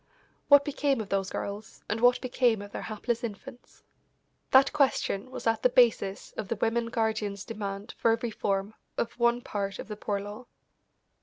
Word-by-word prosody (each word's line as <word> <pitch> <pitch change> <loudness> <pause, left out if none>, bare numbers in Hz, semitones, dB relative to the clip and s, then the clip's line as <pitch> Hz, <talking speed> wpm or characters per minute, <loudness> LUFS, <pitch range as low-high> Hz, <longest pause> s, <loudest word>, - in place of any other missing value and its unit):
What 285 -1 +7
became 285 -3 0
of 210 -3 -5
those 195 -1 0
girls, 205 +2 -6
and 220 +2 -2
what 245 +1 +5
became 245 -4 +1
of 205 - -11
their - - -5
hapless 225 +2 -3
infants? 235 +3 -8 0.7
That 270 +1 +6
question 265 -6 +1
was 260 - -8
at 225 -1 +2
the 250 - +4
basis 235 -6 +2
of 215 - -3
the 230 - -1
women 230 +2 0
guardians' 220 -3 -1
demand 200 -2 -5
for 230 - +4
a 225 - +2
reform 205 -3 -2 0.2
of 235 - -1
one 235 0 +3
part 200 -3 -3
of - - -7
the 210 - -4
Poor 205 -1 -2
Law. 205 +5 -8
225 Hz, 175 wpm, -28 LUFS, 205-245 Hz, 0.7 s, What